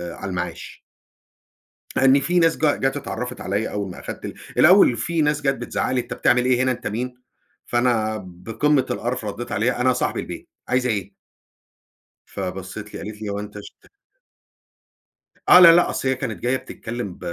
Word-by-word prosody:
على 100 - -6
المعاش. 90 -1 -6 1.1
لأن 135 +1 +5
في 175 +6 +1
ناس 165 -1 +3
جا 150 -2 +2
جات 135 +1 -1
اتعرفت 125 -3 -5
عليّا 100 +3 -2
أول 100 -2 -4
ما - - -10
أخدت - - -7 0.2
الأول 175 -8 +6
في 165 +8 -1
ناس 150 0 +1
جات 135 -1 +1
بتزعق 120 - -2
لي: 130 -1 +1
"أنت - - -7
بتعمل 125 0 +2
إيه 125 0 +3
هنا؟ 130 - +2
أنت 120 - -4
مين؟" 125 +4 -4 0.5
فأنا 115 -3 +1
بقمة 115 +11 0
القرف 120 -1 -3
رديت 105 +3 -5
عليها: 115 +4 0
"أنا 130 0 +3
صاحب 125 - -1
البيت. - - -7 0.2
عايزة 125 0 +1
إيه؟" 100 -3 -2 1.1
فبصت 95 +2 -6
لي - - -5
قالت 105 +1 -8
لي: 105 - -4
"هو 100 0 -3
انت 105 0 -9
اشت" 105 - -10 1.7
آه، 180 - +9
لا، 170 -2 +10
لا، 175 - +3
أصل 135 - -2
هي 130 - +2
كانت 125 -4 -5
جاية 125 +2 +1
بتتكلم 115 -6 -6
ب - - -19
120 Hz, 175 wpm, -22 LUFS, 105-130 Hz, 1.7 s, لا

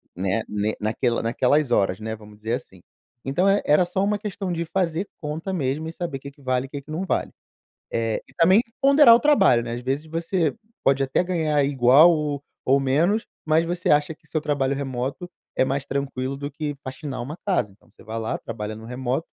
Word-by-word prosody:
né, 95 +4 0
ne 105 +1 -1
naquela 115 +3 0
naquelas 130 +5 +2
horas, 95 -4 +2
né, 110 0 -4
vamos 105 -1 -15
dizer 110 +2 -3
assim. 95 -7 -6 0.4
Então 155 +8 +1
é 200 +1 +3
era 150 +4 +5
só 180 +2 -2
uma 205 +1 +1
questão 200 -2 -4
de 170 0 -1
fazer 175 +1 -1
conta 160 +5 -4
mesmo 150 -1 -1
e - - -4
saber 165 -5 -5
que 140 +1 -9
que 140 - -23
vale 130 -1 0
e - - -24
que 140 0 -6
que 155 - -13
não 170 +5 -2
vale. - - -1 0.6
Eh, 115 -1 -1
e - - -20
também 185 +5 +5 0.2
ponderar 275 -3 +8
o 235 - +4
trabalho 195 - +4
né? 115 - -6
Ás 120 - -5
vezes 135 +4 -2
você 165 0 -1 0.3
pode 135 0 +3
até 135 +6 +1
ganhar 155 -5 +1
igual 135 +4 +6
ou 150 -3 -2 0.2
ou 135 +2 +4
menos, 165 +11 +2 0.2
mas 160 +1 +3
você 175 +1 -2
acha 150 +2 +3
que 160 - -31
seu 155 +3 -1
trabalho 140 -2 0
remoto 135 +5 -4 0.3
é - - +4
mais 135 +1 -2
tranquilo 135 -1 -3
do 140 +1 -5
que 150 0 -4
faxinar 130 0 -5
uma 145 +6 -6
casa. 180 - +1
Então 100 - -26
você - - -19
vai 110 +2 -5
lá, 110 0 -2
trabalha 110 -1 -6
no 110 - -11
remoto 130 +5 -2
140 Hz, 210 wpm, -24 LUFS, 125-165 Hz, 0.6 s, ponderar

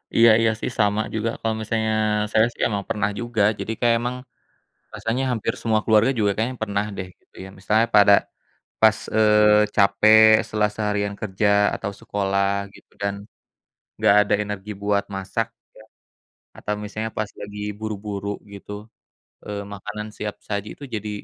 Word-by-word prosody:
Iya 115 0 +7
iya, 115 -1 +3
sih, - - -2
sama 105 0 +2
juga 110 +1 -1
kalau 110 -1 -1
misalnya 110 0 -1 0.4
saya, 110 +1 +4
sih, - - -10
emang 100 -3 -3
pernah 105 0 0
juga, 120 -2 -2 0.2
jadi 110 - -4
kayak 120 -1 +3
emang 125 +1 -2 0.8
rasanya 120 +4 -2
hampir 115 -4 -1
semua 110 -2 +1
keluarga 110 +3 +4
juga 105 -2 +2
kayaknya 120 +4 -2
pernah, 100 -1 -1
deh, 95 -1 -5
gitu, - - -40
ya, - - -9
misalnya 110 +4 +2
pada 100 0 +7 0.7
pas, 110 -1 +5 0.2
eee, 105 -1 +5
capek 105 +2 +5 0.3
setelah 105 -1 0
seharian 105 -1 -1
kerja 105 0 -1 0.3
atau 100 - -4
sekolah 100 -2 -1
gitu - - -19
dan 100 0 -1 0.8
enggak 100 - +4
ada 105 - 0
energi 105 0 -6
buat 100 0 +1
masak, 105 +4 -2 0.3
ya, 110 - -14 0.8
atau 105 - -3
misalnya 110 +1 -4
pas 105 -1 -2
lagi 105 0 -7 0.2
buru-buru 105 -2 -5 0.3
gitu, 100 +1 -10 0.7
eee, 100 -1 -5
makanan 105 +2 -6
siap 105 -1 -4
saji 100 0 -3
itu 145 - -12
jadi, 105 0 -4
105 Hz, 155 wpm, -23 LUFS, 100-110 Hz, 0.8 s, Iya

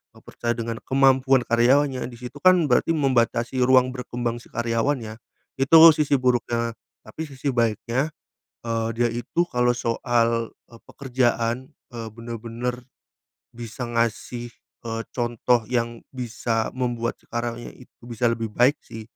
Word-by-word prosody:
eee, - - -17
percaya 120 0 -3
dengan 115 -1 -4
kemampuan 135 -1 +3
karyawannya, 130 +3 +3
di - - -11
situ 125 +4 -9
kan, 185 0 +7
berarti 125 +5 +2
membatasi 130 -3 +1
ruang 130 0 +4
berkembang 120 -1 -3
si - - -18
karyawan 120 +4 0
ya. 110 0 -7 0.4
Itu 150 +4 +6 0.2
sisi 145 -2 +2
buruknya, 120 -2 0 0.3
tapi 130 +9 -7
sisi 135 0 -3
baiknya, 115 +5 0 0.6
eee, 115 -1 -1
dia 120 - +4
itu 120 +9 -1
kalau 125 -3 +2
soal, 115 -1 0 0.2
eee, 115 -1 -16
pekerjaan, 125 -2 -1 0.3
eee, 115 -1 -5
bener-bener 115 +2 -5 0.7
bisa 120 +1 -7
ngasih, 120 +1 -2 0.3
eee, 115 0 -3
contoh 120 -1 0
yang 120 -1 -1 0.2
bisa 115 -2 -2
membuat 120 -2 -2
si - - -29
karyawannya 120 0 -5
itu 125 - -19
bisa 120 0 0
lebih 115 -2 -3
baik 130 +5 +3
sih. 110 - -8
120 Hz, 140 wpm, -24 LUFS, 115-130 Hz, 0.7 s, kan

